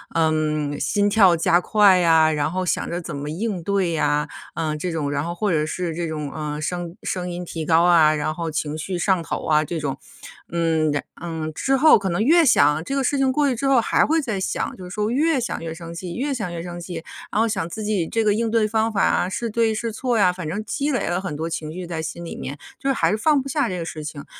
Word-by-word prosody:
嗯， 155 Hz, -2 st, 0 dB
心 205 Hz, 0 st, +1 dB
跳 195 Hz, -5 st, +5 dB
加 170 Hz, +1 st, +3 dB
快 205 Hz, -2 st, +5 dB
呀， 160 Hz, -3 st, +4 dB
然 150 Hz, +1 st, 0 dB
后 185 Hz, 0 st, -2 dB
想 -, -, -1 dB
着 175 Hz, +1 st, -3 dB
怎 165 Hz, -3 st, -6 dB
么 145 Hz, +1 st, -5 dB
应 185 Hz, +3 st, -3 dB
对 195 Hz, -2 st, 0 dB
呀， 150 Hz, -1 st, +1 dB, 0.3 s
嗯， 155 Hz, -2 st, -2 dB
这 180 Hz, +4 st, -3 dB
种。 155 Hz, -3 st, -2 dB
然 145 Hz, +1 st, -1 dB
后 170 Hz, -, -3 dB
或 205 Hz, +1 st, 0 dB
者 155 Hz, -1 st, +1 dB
是 170 Hz, +1 st, -3 dB
这 170 Hz, -1 st, -2 dB
种， 150 Hz, -3 st, -4 dB
呃， 150 Hz, -1 st, -4 dB
声 175 Hz, +1 st, -4 dB
声 180 Hz, -1 st, -3 dB
音 175 Hz, 0 st, -5 dB
提 160 Hz, -2 st, -5 dB
高 165 Hz, +1 st, +4 dB
啊， 165 Hz, -3 st, +5 dB
然 150 Hz, +1 st, -1 dB
后 165 Hz, 0 st, -4 dB
情 150 Hz, 0 st, -2 dB
绪 180 Hz, +3 st, -3 dB
上 185 Hz, -1 st, +2 dB
头 -, -, -4 dB
啊 155 Hz, -1 st, +3 dB
这 165 Hz, +2 st, -4 dB
种。 140 Hz, -3 st, -3 dB, 0.6 s
嗯， 160 Hz, -2 st, +1 dB
然 145 Hz, -, 0 dB, 0.2 s
嗯， 160 Hz, -2 st, -4 dB
之 270 Hz, -, +1 dB
后 310 Hz, +3 st, +7 dB
可 195 Hz, -2 st, -2 dB
能 175 Hz, +5 st, 0 dB
越 325 Hz, +6 st, +5 dB
想， 150 Hz, -, +4 dB
这 275 Hz, -, -5 dB
个 275 Hz, -2 st, 0 dB
事 285 Hz, -, +1 dB
情 265 Hz, -1 st, +2 dB
过 290 Hz, +2 st, +2 dB
去 250 Hz, -, 0 dB
之 275 Hz, +4 st, -2 dB
后 270 Hz, -2 st, +5 dB
还 230 Hz, -, +2 dB
会 320 Hz, +1 st, +2 dB
再 225 Hz, -8 st, -3 dB
想， 190 Hz, -, -2 dB
就 185 Hz, -, -11 dB
是 180 Hz, -, -8 dB
说 210 Hz, +3 st, -1 dB
越 290 Hz, +3 st, +2 dB
想 240 Hz, -, -3 dB
越 165 Hz, -1 st, -4 dB
生 170 Hz, 0 st, -9 dB
气， 175 Hz, 0 st, -6 dB
越 280 Hz, +3 st, -1 dB
想 205 Hz, -8 st, -3 dB
越 170 Hz, -1 st, -5 dB
生 175 Hz, 0 st, -7 dB
气。 175 Hz, 0 st, -7 dB, 0.4 s
然 215 Hz, -, +1 dB
后 230 Hz, -, +3 dB
想 190 Hz, -6 st, -2 dB
自 215 Hz, +5 st, -6 dB
己 205 Hz, -6 st, 0 dB
这 225 Hz, +4 st, -1 dB
个 210 Hz, -, +4 dB
应 225 Hz, +1 st, -1 dB
对 225 Hz, -2 st, +3 dB
方 220 Hz, +1 st, +1 dB
法 195 Hz, -3 st, 0 dB
啊， 180 Hz, -, +2 dB
是 230 Hz, +4 st, -3 dB
对 225 Hz, 0 st, +1 dB
是 225 Hz, 0 st, -3 dB
错 240 Hz, 0 st, -1 dB
呀。 180 Hz, -3 st, +4 dB
反 180 Hz, -4 st, -6 dB
正 200 Hz, +6 st, -3 dB
积 290 Hz, +1 st, -1 dB
累 255 Hz, -, -1 dB
了 175 Hz, +2 st, -1 dB
很 155 Hz, -7 st, -5 dB
多 160 Hz, +1 st, -3 dB
情 155 Hz, -1 st, -4 dB
绪 180 Hz, +1 st, -6 dB
在 165 Hz, -2 st, -4 dB
心 170 Hz, +2 st, -6 dB
里 -, -, -6 dB
面， 140 Hz, +2 st, -6 dB, 0.2 s
就 275 Hz, -, -2 dB
是 -, -, +3 dB
还 -, -, +2 dB
是 210 Hz, -, +2 dB
放 295 Hz, +4 st, +3 dB
不 270 Hz, -, -7 dB
下 275 Hz, -3 st, 0 dB
这 180 Hz, -, -3 dB
个 165 Hz, -, -4 dB
事 155 Hz, -2 st, -6 dB
情。 150 Hz, -2 st, -7 dB
175 Hz, 285 characters per minute, -22 LUFS, 160-220 Hz, 0.6 s, 后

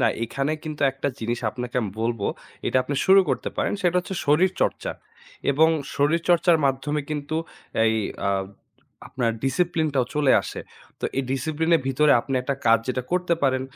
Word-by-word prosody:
না 125 Hz, -, +4 dB, 0.2 s
এইখানে 135 Hz, +6 st, -1 dB
কিন্তু 155 Hz, -1 st, -6 dB
একটা 135 Hz, +1 st, -2 dB
জিনিস 120 Hz, +1 st, -2 dB
আপনাকে 125 Hz, +1 st, -5 dB
আমি 105 Hz, -, -2 dB
বলব 115 Hz, -1 st, -1 dB, 0.5 s
এটা -, -, +1 dB
আপনি 140 Hz, -, -4 dB
শুরু 195 Hz, +1 st, +8 dB
করতে -, -, -1 dB
পারেন। -, -, 0 dB
সেটা 180 Hz, 0 st, +2 dB
হচ্ছে 185 Hz, +2 st, -6 dB
শরীরচর্চা। 185 Hz, -, +1 dB, 0.6 s
এবং 155 Hz, +3 st, +4 dB, 0.3 s
শরীরচর্চার 170 Hz, +3 st, +3 dB
মাধ্যমে 135 Hz, +3 st, -1 dB
কিন্তু 150 Hz, +1 st, -3 dB, 0.5 s
এই 110 Hz, 0 st, +3 dB, 0.3 s
আ -, -, +2 dB, 0.8 s
আপনার 120 Hz, -3 st, 0 dB
discipline-টাও 155 Hz, -2 st, +1 dB
চলে 145 Hz, -3 st, +3 dB
আসে। -, -, -6 dB, 0.4 s
তো -, -, -4 dB
এই -, -, +2 dB
discipline-এর 160 Hz, +4 st, +1 dB
ভিতরে 145 Hz, +2 st, +4 dB
আপনি 135 Hz, +3 st, -4 dB
একটা 140 Hz, +2 st, -1 dB
কাজ 115 Hz, 0 st, +6 dB
যেটা 130 Hz, 0 st, -1 dB
করতে 180 Hz, -1 st, +2 dB
পারেন। 130 Hz, -1 st, +2 dB
145 Hz, 155 wpm, -24 LUFS, 130-160 Hz, 0.8 s, শুরু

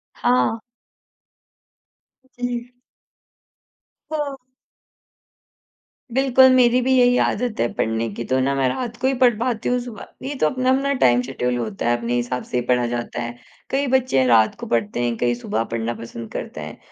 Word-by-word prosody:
हाँ। 245 Hz, -2 st, +1 dB, 1.7 s
जी। 245 Hz, 0 st, -4 dB, 1.4 s
हाँ। 295 Hz, -3 st, -2 dB, 1.8 s
बिल्कुल, 260 Hz, +1 st, +5 dB
मेरी 250 Hz, -1 st, +5 dB
भी 260 Hz, +2 st, 0 dB
यही 245 Hz, 0 st, +5 dB
आदत 240 Hz, -1 st, -2 dB
है 120 Hz, -, +2 dB
पढ़ने 115 Hz, +1 st, -1 dB
की 120 Hz, -, -5 dB
तो 130 Hz, +2 st, +1 dB
ना 135 Hz, +1 st, +1 dB
मैं 135 Hz, -1 st, +2 dB
रात 240 Hz, -, -4 dB
को 260 Hz, -, +2 dB
ही 270 Hz, -, +2 dB
पढ़ 245 Hz, -3 st, +4 dB
पाती 235 Hz, -2 st, -1 dB
हूँ 250 Hz, -, +1 dB
सुबह 240 Hz, -3 st, -8 dB, 0.2 s
ये 285 Hz, -, -3 dB
तो -, -, +5 dB
अपना-अपना 260 Hz, +1 st, +1 dB
टाइम 120 Hz, 0 st, +5 dB
शेड्यूल 125 Hz, -1 st, -2 dB
होता 115 Hz, -1 st, -2 dB
है 120 Hz, -, +2 dB
अपने 120 Hz, 0 st, -3 dB
हिसाब 120 Hz, +1 st, -2 dB
से -, -, -3 dB
ही -, -, -3 dB
पढ़ा 125 Hz, -1 st, +2 dB
जाता 120 Hz, 0 st, -4 dB
है। 120 Hz, 0 st, -5 dB, 0.3 s
कई 275 Hz, +1 st, 0 dB
बच्चे 255 Hz, -, +2 dB
रात 110 Hz, -2 st, +4 dB
को -, -, -6 dB
पढ़ते 115 Hz, 0 st, -1 dB
हैं, 120 Hz, -1 st, 0 dB
कई 120 Hz, 0 st, +1 dB
सुबह 115 Hz, -2 st, -2 dB
पढ़ना 115 Hz, 0 st, -3 dB
पसंद 115 Hz, -1 st, -8 dB
करते -, -, -6 dB
हैं, -, -, -8 dB
135 Hz, 165 wpm, -21 LUFS, -, 1.8 s, बिल्कुल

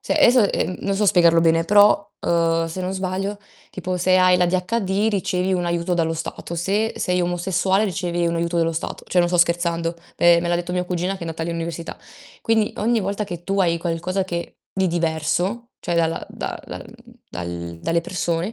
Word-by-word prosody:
Cioè, -, -, -1 dB
esso, 240 Hz, -4 st, +5 dB
ehm, 185 Hz, -, -1 dB
non 200 Hz, -, -1 dB
so 205 Hz, +1 st, +1 dB
spiegarlo 170 Hz, -3 st, +5 dB
bene 165 Hz, 0 st, +3 dB
però, 205 Hz, +1 st, +5 dB
uhm, 165 Hz, -1 st, +1 dB
se 165 Hz, +3 st, -6 dB
non 185 Hz, +1 st, -2 dB
sbaglio 195 Hz, +2 st, -3 dB, 0.3 s
tipo 185 Hz, 0 st, -3 dB
se 185 Hz, +1 st, +3 dB
hai 185 Hz, 0 st, +5 dB
l'ADHD 190 Hz, +3 st, +1 dB
ricevi 185 Hz, -2 st, 0 dB
un 175 Hz, -1 st, -1 dB
aiuto 170 Hz, +1 st, 0 dB
dallo 165 Hz, -1 st, 0 dB
Stato, 165 Hz, +1 st, -6 dB
se 200 Hz, +6 st, 0 dB
sei 180 Hz, 0 st, 0 dB
omosessuale 185 Hz, +3 st, +1 dB
ricevi 175 Hz, -3 st, -1 dB
un 170 Hz, 0 st, 0 dB
aiuto 170 Hz, +1 st, -1 dB
dallo 165 Hz, 0 st, +1 dB
Stato. 160 Hz, -, -5 dB
Cioè 180 Hz, -, +1 dB
non 175 Hz, 0 st, +4 dB
sto 180 Hz, -, 0 dB
scherzando, 170 Hz, -1 st, +1 dB, 0.2 s
me 170 Hz, 0 st, +6 dB
me 170 Hz, -, -2 dB
l'ha 175 Hz, -, +2 dB
detto 175 Hz, +1 st, -3 dB
mia 180 Hz, 0 st, 0 dB
cugina 180 Hz, +1 st, -2 dB
che 195 Hz, -, -10 dB
è -, -, -6 dB
andata 165 Hz, -1 st, -4 dB
all'università. 170 Hz, 0 st, -4 dB, 0.4 s
Quindi 220 Hz, -2 st, +1 dB
ogni 230 Hz, +1 st, +1 dB
volta 200 Hz, +2 st, -2 dB
che 175 Hz, -3 st, -7 dB
tu 195 Hz, +2 st, -1 dB
hai 170 Hz, -2 st, +2 dB
qualcosa 175 Hz, +3 st, -2 dB
che 170 Hz, -2 st, -5 dB, 0.2 s
di 190 Hz, -1 st, +1 dB
diverso, 175 Hz, +7 st, -1 dB
cioè 175 Hz, -, -2 dB
dalla 165 Hz, -1 st, 0 dB
da -, -, -5 dB
dal -, -, -7 dB, 0.4 s
dal 85 Hz, -1 st, -6 dB
dalle 165 Hz, -, +1 dB
persone, 175 Hz, +2 st, -2 dB
175 Hz, 195 wpm, -22 LUFS, 170-190 Hz, 0.4 s, me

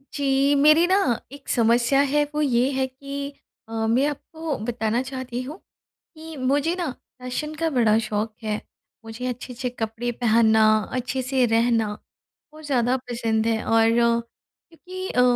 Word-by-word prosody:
जी। 275 Hz, 0 st, +2 dB
मेरी 305 Hz, +4 st, +6 dB
ना 375 Hz, +2 st, +4 dB, 0.3 s
एक 280 Hz, 0 st, -13 dB
समस्या 235 Hz, +3 st, +3 dB
है 295 Hz, +1 st, +3 dB
वो 300 Hz, -, 0 dB
ये 255 Hz, -2 st, +2 dB
है 265 Hz, -1 st, 0 dB
कि 280 Hz, +2 st, -7 dB, 0.4 s
अ, -, -, -12 dB, 0.2 s
मैं 245 Hz, +5 st, +3 dB
आपको 310 Hz, +1 st, -5 dB
बताना 235 Hz, 0 st, -1 dB
चाहती 260 Hz, -2 st, -5 dB
हूँ 285 Hz, +6 st, -7 dB, 0.6 s
कि 320 Hz, 0 st, -9 dB
मुझे 280 Hz, +5 st, +1 dB
ना 350 Hz, -3 st, -2 dB, 0.3 s
फ़ैशन 255 Hz, +5 st, -4 dB
का 325 Hz, +1 st, 0 dB
बड़ा 230 Hz, -7 st, +3 dB
शौक 215 Hz, 0 st, -2 dB
है। 215 Hz, -1 st, -2 dB, 0.4 s
मुझे 225 Hz, +3 st, -7 dB
अच्छे-अच्छे 250 Hz, +1 st, -4 dB
कपड़े 230 Hz, 0 st, -3 dB
पहनना, 220 Hz, -2 st, +3 dB, 0.3 s
अच्छे 255 Hz, +1 st, -2 dB
से 255 Hz, 0 st, +1 dB
रहना 230 Hz, -1 st, +2 dB, 0.6 s
बहुत 310 Hz, 0 st, -12 dB
ज़्यादा 255 Hz, -2 st, +1 dB
पसंद 225 Hz, -2 st, 0 dB
है। 225 Hz, -1 st, 0 dB
और 225 Hz, 0 st, +4 dB
क्योंकि 240 Hz, +10 st, -3 dB
अ, 250 Hz, -, +2 dB
255 Hz, 150 wpm, -24 LUFS, 230-285 Hz, 0.6 s, मेरी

